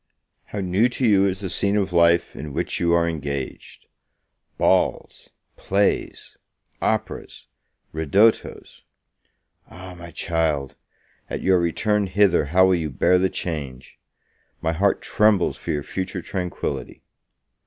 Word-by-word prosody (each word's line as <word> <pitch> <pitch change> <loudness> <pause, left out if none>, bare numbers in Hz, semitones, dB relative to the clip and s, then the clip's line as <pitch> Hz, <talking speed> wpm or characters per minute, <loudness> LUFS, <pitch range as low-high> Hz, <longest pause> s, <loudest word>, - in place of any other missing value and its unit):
How 100 - -5
new 95 +6 +2
to 125 +1 -2
you 100 -2 +4
is 95 0 -3
the 95 - -4
scene 100 +2 +1
of 95 -3 -1
life 85 0 +3
in 75 0 -7
which - - -2
you 85 -1 +1
are 85 0 +3
engaged! 70 -4 -5 0.7
balls - - 0 0.3
plays 100 +1 -1 0.4
operas - - -3 0.5
ridottos! 95 +9 +1 0.9
Ah, 90 +1 -10
my 85 -1 -10
child! 80 -4 -1 0.6
At - - -4
your 95 -1 +4
return 105 +4 0
hither, 95 -4 +3
how 90 +5 +4
will 95 - +3
you 80 -3 -1
bear 90 +6 +2
the 95 +1 +2
change? 70 -9 -6 0.6
My 80 0 -1
heart 95 +4 +1
trembles 105 -4 +2
for - - -10
your 75 -1 -1
future 95 +5 -5
tranquility. 90 -3 -5
90 Hz, 130 wpm, -23 LUFS, 80-100 Hz, 0.9 s, you